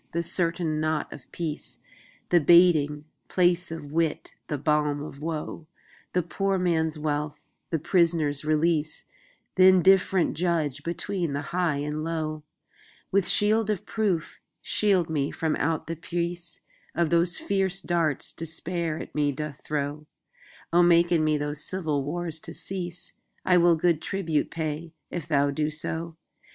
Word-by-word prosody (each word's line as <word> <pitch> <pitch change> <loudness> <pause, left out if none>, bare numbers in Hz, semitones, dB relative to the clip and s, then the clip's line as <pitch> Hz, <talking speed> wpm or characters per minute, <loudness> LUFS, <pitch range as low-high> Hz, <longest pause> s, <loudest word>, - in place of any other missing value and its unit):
the 170 +1 0
certain 165 -2 +1
knot 155 -1 -1
of 140 - -14
peace, 160 -3 -5 0.5
The 175 - +5
baiting 150 -3 +5 0.2
place 180 0 +2
of 155 -3 -7
wit, 165 0 -1
the 150 - -2
balm 150 0 +1
of 145 -1 -9
woe, 160 0 -4 0.5
The 180 - +2
poor 195 +3 -1
man's 160 -3 +1
wealth, 150 -1 -3 0.3
the 165 - 0
prisoner's 160 -3 +2
release, 155 0 +1 0.5
Th' - - -8
indifferent 185 0 +5
judge 160 -5 0
between 170 0 -2
the 145 +1 -2
high 175 -4 +1
and 150 +2 -3
low; 155 -2 -3 0.7
With 195 -1 +2
shield 215 +1 +3
of 210 -4 -1
proof, 195 -8 -1 0.2
shield 195 -5 +2
me 145 -3 -1
from 160 -1 -1
out 160 +1 -1
the 165 - -4
preaseOf 170 0 -4 0.3
those 170 +1 +2
fierce 195 -1 0
darts 170 -6 0
Despair 165 0 -3
at - - -8
me 145 -1 +1
doth 145 +1 -6
throw:O 150 +3 -3
make 175 0 +5
in 165 -3 +3
me 155 -1 +2
those 145 0 0
civil 160 -6 0
wars 165 +2 -3
to - - -8
cease;I 180 0 -3
will 175 -1 +5
good 165 -1 +1
tribute 165 -6 -1
pay, 160 0 -4 0.2
if 170 -4 -5
thou 145 -2 +2
do 150 +2 -1
so. 160 +2 -5
165 Hz, 140 wpm, -26 LUFS, 150-175 Hz, 0.7 s, The